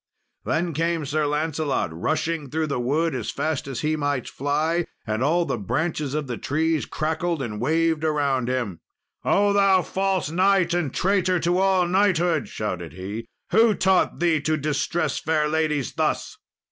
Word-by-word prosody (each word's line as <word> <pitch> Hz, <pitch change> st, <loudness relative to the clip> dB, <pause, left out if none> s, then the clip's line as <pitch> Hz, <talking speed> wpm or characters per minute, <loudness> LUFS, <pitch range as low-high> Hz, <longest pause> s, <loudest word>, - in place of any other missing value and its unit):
Then 170 Hz, 0 st, 0 dB
came 165 Hz, 0 st, 0 dB
Sir 150 Hz, +1 st, 0 dB
Lancelot 150 Hz, -, -1 dB
rushing 155 Hz, -, -2 dB
through 160 Hz, +2 st, -1 dB
the 140 Hz, -4 st, -2 dB
wood 155 Hz, +7 st, 0 dB
as 120 Hz, -5 st, -3 dB
fast 155 Hz, -3 st, -2 dB
as 130 Hz, -3 st, -4 dB
he 155 Hz, +1 st, +1 dB
might 145 Hz, -4 st, -1 dB
fly, 155 Hz, +5 st, 0 dB, 0.2 s
and 110 Hz, +1 st, -2 dB
all 165 Hz, +6 st, +2 dB
the 120 Hz, -, -2 dB
branches 150 Hz, -, -2 dB
of 155 Hz, -1 st, -1 dB
the 120 Hz, -3 st, -5 dB
trees 160 Hz, +2 st, 0 dB
crackled 160 Hz, +2 st, -1 dB
and 105 Hz, -5 st, -4 dB
waved 160 Hz, +3 st, +1 dB
around 140 Hz, -5 st, +1 dB
him. 120 Hz, -9 st, -2 dB, 0.4 s
"O 205 Hz, 0 st, +3 dB
thou 195 Hz, -2 st, +4 dB
false 190 Hz, -4 st, -1 dB
knight 185 Hz, 0 st, +3 dB
and 175 Hz, -6 st, 0 dB
traitor 185 Hz, 0 st, +1 dB
to 175 Hz, +2 st, +1 dB
all 190 Hz, -2 st, +3 dB
knighthood!" 175 Hz, -, +2 dB
shouted 90 Hz, -7 st, -4 dB
he, 100 Hz, +6 st, -6 dB, 0.2 s
"who 225 Hz, -1 st, +5 dB
taught 190 Hz, -1 st, +2 dB
thee 165 Hz, -3 st, +2 dB
to 155 Hz, +1 st, 0 dB
distress 150 Hz, +1 st, -1 dB
fair 155 Hz, -1 st, +1 dB
ladies 150 Hz, -3 st, 0 dB
thus?" -, -, -1 dB
155 Hz, 160 wpm, -24 LUFS, 140-175 Hz, 0.4 s, who